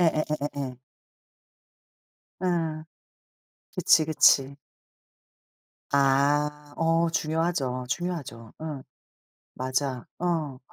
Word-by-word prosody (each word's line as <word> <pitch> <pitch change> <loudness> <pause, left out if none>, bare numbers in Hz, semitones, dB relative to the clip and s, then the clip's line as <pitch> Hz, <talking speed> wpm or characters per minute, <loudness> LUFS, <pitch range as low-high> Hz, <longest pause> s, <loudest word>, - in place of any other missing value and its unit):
예예예예예. 145 -5 -1 1.6
예. 165 -4 -1 0.9
그치, 155 - +4
그치. 140 -3 +4 1.4
아 145 +2 +2
어 165 +1 +3
중요하죠. 155 -6 -1
중요하죠. 140 -9 -4
어. 155 -3 -5 0.7
맞아. 130 0 -2
어. 160 -7 -1
150 Hz, 135 characters per minute, -27 LUFS, 135-165 Hz, 1.6 s, 그치